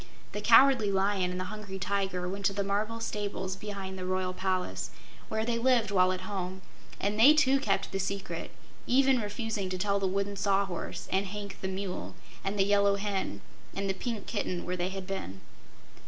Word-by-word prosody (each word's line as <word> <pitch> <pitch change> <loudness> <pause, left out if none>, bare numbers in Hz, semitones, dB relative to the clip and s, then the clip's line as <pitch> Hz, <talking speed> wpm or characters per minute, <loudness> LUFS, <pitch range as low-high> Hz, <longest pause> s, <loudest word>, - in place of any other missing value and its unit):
The 210 - -4
Cowardly 230 0 +6
Lion 195 -1 +2
and 180 0 -3
the - - -1
Hungry 205 -2 -6
Tiger 190 -1 -1
went 195 +2 -4
to 200 - -1
the 200 0 -1
marble 210 +3 -1
stables 205 -4 -3
behind 195 -2 -6
the - - -4
Royal 185 0 0
Palace, 185 0 -1 0.4
where 220 0 -1
they 230 0 0
lived 235 -4 +3
while 185 -2 +4
at 185 0 -3
home, 185 -1 -4 0.4
and 205 +2 -1
they 280 +7 +9
too 275 -3 +4
kept 205 -7 0
the 195 - -2
secret, 195 0 -3 0.4
even 265 -1 +4
refusing 210 -2 -3
to 185 - -2
tell 200 +1 +1
the 195 - +1
Wooden 200 +2 -1
Sawhorse, 195 -2 -1
and 195 +1 +1
Hank 205 +1 -6
the 190 - -1
Mule, 190 -1 -4 0.3
and 195 +1 -2
the 195 - +4
Yellow 200 0 +4
Hen, 195 - -2 0.3
and 195 0 -1
the 190 - +1
Pink 220 +1 -4
Kitten 185 -5 -2
where 180 - -2
they 180 0 -1
had 190 0 -5
been. 95 - -5
200 Hz, 190 wpm, -30 LUFS, 190-210 Hz, 0.4 s, they